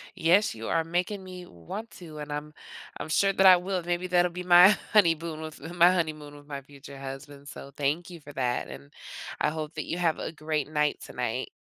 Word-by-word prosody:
Yes, 175 - +3
you 110 0 -6
are 165 - +1
making 180 +4 -2
me 180 -1 -9
want 185 - -8
to, 160 -4 -11
and 150 0 -7
I'm 150 +1 -5 0.5
I'm - - -6
sure 195 +5 +3
that 195 - +3
I 185 -1 +9
will, 180 0 -3
maybe 175 +1 -2
that'll 180 -1 +3
be 180 +1 -6
my, 180 +3 +8 0.2
honeymoon 165 -5 +3
with 155 -1 -8
my 175 +1 +6
honeymoon 155 -4 -2
with 145 0 -15
my 140 -2 -6
future 140 0 -13
husband, 140 +1 -9
so 140 -1 -9
thank 150 +5 -1
you 175 -2 -10
for 145 0 -12
that, 125 -2 -1
and 70 +1 -11 0.5
I - - +2
hope 155 0 -5
that 155 - -4
you 170 - -3
have 170 -3 +1
a - - -4
great 155 -2 -3
night 150 -1 0
tonight. - - -3
160 Hz, 210 wpm, -27 LUFS, 145-180 Hz, 0.5 s, I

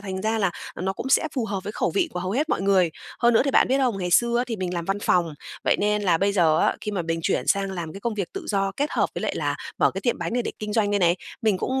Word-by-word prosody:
thành 190 -1 -5
ra 220 +1 0
là 195 -3 +2 0.3
nó 190 +2 -1
cũng 260 - -5
sẽ 290 +3 +3
phù 250 - 0
hợp 200 -3 -3
với 210 - -4
khẩu - - 0
vị 365 -4 +1
của 180 - -3
hầu 185 +1 -3
hết 295 +8 0
mọi - - 0
người. 190 -4 +3 0.3
Hơn 240 -1 +4
nữa - - +5
thì 280 - +1
bạn - - +4
biết 270 +1 +2
không? 245 -7 +1
Ngày 180 -1 -2
xưa 235 +5 +4
á 245 - +1
thì 230 -3 -3
mình 180 -2 -3
làm 170 -1 -2
văn 195 +2 -1
phòng, 170 -6 +1 0.3
vậy - - +3
nên 210 0 +1
là 170 -4 +3
bây 200 +1 +2
giờ 160 -5 +3
á, - - +3
khi 210 - -3
mà 180 -4 -1
mình 165 0 -2
chuyển - - 0
sang 195 -1 +2
làm 170 -4 -5
cái 195 - -9
công 230 0 -2
việc 195 -4 -3
tự - - -6
do 195 -1 0
kết 290 +2 0
hợp - - +2
với - - -4
lại - - -1
là - - -1 0.2
mở - - +4
cái - - -5
tiệm 240 - 0
bánh - - -3
này 245 0 +1
để - - -3
kinh 210 0 -4
doanh 205 -2 +2
đây 205 - +2
này, 175 -1 +3 0.3
mình 210 -4 +2
cũng 265 +6 -1
200 Hz, 325 wpm, -24 LUFS, 185-230 Hz, 0.3 s, nữa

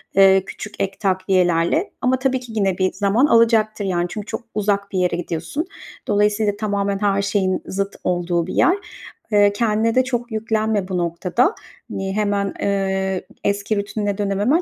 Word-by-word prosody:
eee, 195 0 +6
küçük 210 - -8
ek 195 0 -2
takviyelerle 185 - +1
ama 255 +1 +2
tabii 260 -1 +1
ki 245 -2 -11
yine 195 -4 +1
bir 185 -1 +1
zaman 205 +6 +2
alacaktır, 225 -4 +3
yani, 175 -2 0
çünkü 210 -2 -6
çok - - -5
uzak 200 -1 0
bir 190 - -1
yere 180 -1 +1
gidiyorsun. 175 - -3 0.4
Dolayısıyla, 205 0 +2
tamamen 200 -2 -1
her 200 -1 +2
şeyin 195 -2 0
zıt 195 +1 -3
olduğu 175 -1 0
bir - - -5
yer. 355 - +4 0.6
Eee, 205 -1 +5
kendine 225 +1 +1
de 255 - +5
çok 240 -2 -3
yüklenme 220 -2 0
bu 185 -2 -2
noktada. 175 - +1 0.4
Hani, 195 0 -3
hemen, 200 -2 0
eee, 190 -1 0 0.2
eski 200 +1 0
rutinine 205 0 -2
dönememen 205 - +1
200 Hz, 160 wpm, -21 LUFS, 190-215 Hz, 0.6 s, eee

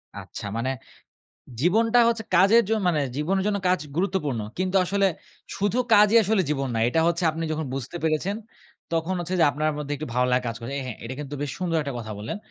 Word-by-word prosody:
আচ্ছা - - -8
মানে 130 +3 -1 0.9
জীবনটা 225 +8 +3
হচ্ছে 230 -2 -1
কাজের 200 +6 +6
জন 220 - +2
মানে 160 -4 +2 0.2
জীবনের 190 +6 0
জন্য 205 -1 +1
কাজ 185 -2 +2 0.2
গুরুত্বপূর্ণ। 170 - 0 0.2
কিন্তু 185 +1 0
আসলে 200 +2 +2 0.5
শুধু 205 +5 0 0.2
কাজই 210 +2 +6
আসলে 210 -1 +2
জীবন 135 -3 -1
নয়। 115 0 +2
এটা 160 +6 +1
হচ্ছে 170 +1 0
আপনি 165 +1 -4
যখন 155 -1 -3
বুঝতে 135 +5 -5
পেরেছেন, 160 +6 0 0.6
তখন 165 +3 0
হচ্ছে 175 +2 -3
যে - - +7
আপনার 155 +2 0
মধ্যে 145 0 -4
একটু 155 - -6
ভালো 125 0 +2
লা 125 - +5
কাজ 115 - -2
করে 115 +4 -6
এহে 130 -3 -5
এটা 125 - -5
কিন্তু 145 0 -6
বেশ 145 - -2
সুন্দর 175 -3 -1
একটা 140 -2 -5
কথা 110 -2 -6
বললেন! 105 +3 -4
165 Hz, 200 wpm, -25 LUFS, 140-195 Hz, 0.9 s, যে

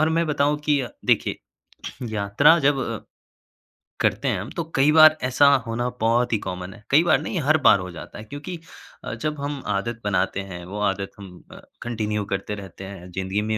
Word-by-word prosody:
और 155 - +3
मैं 165 +1 +1
बताऊँ 150 0 +1
कि 145 -2 +3
अ, 125 - -4 0.2
देखिए - - +1 0.7
यात्रा 110 +10 +4
जब 140 -2 +2
अ, 115 -4 -4 1.0
करते - - +1
हैं - - +1
हम, - - -7
तो 170 - -1
कई 140 +3 +4
बार 155 0 +8
ऐसा 130 +2 +3 0.2
होना 120 +2 -1
बहुत 115 +1 +2
ही - - +3
कॉमन 90 0 -6
है, - - -16
कईं 155 +4 +6
बार - - +4
नहीं, 185 - -3
हर 155 +3 +3
बार 100 - +6
हो 90 0 -6
जाता 85 - -10
है 105 - -8
क्योंकि 145 +9 -7 0.5
अ, - - -5
जब 150 -1 -3
हम 140 -1 -4
आदत 115 +3 -2
बनाते 95 -1 0
हैं, 90 -1 -7
वो 100 +3 -6
आदत 100 0 -4
हम 90 -3 -12
अ, - - -11 0.2
कंटिन्यू 105 -3 -2
करते 100 +1 -3
रहते 95 -1 -10
हैं, 95 -2 -9
ज़िंदगी 95 +3 -2
में 110 0 -1
115 Hz, 205 wpm, -23 LUFS, 100-145 Hz, 1.0 s, बार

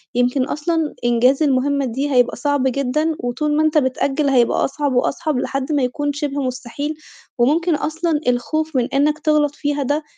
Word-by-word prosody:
يمكن 250 +2 +2
أصلًا 320 +1 -1
إنجاز 250 +5 +3
المهمة 280 0 +1
دي 270 +4 -2
هيبقى 245 -2 +3
صعب 285 +1 0
جدًا، 275 +4 0
وطول 295 +5 -1
ما 310 - +3
أنت 310 0 +2
بتأجل 275 +1 +1
هيبقى 245 -3 +3
أصعب 285 -1 -2
وأصعب 275 +3 0
لحد 275 +3 -3
ما 285 -3 +1
يكون 290 +3 -1
شبه 285 -1 -3
مستحيل. 255 +4 -4 0.4
وممكن 310 +7 +2
أصلًا 315 0 -1
الخوف 310 +5 -1
من 245 -2 +2
إنك 295 +2 +2
تغلط 295 -2 +1
فيها 290 -1 -1
ده 290 +4 -1
285 Hz, 165 wpm, -19 LUFS, 255-300 Hz, 0.4 s, إنجاز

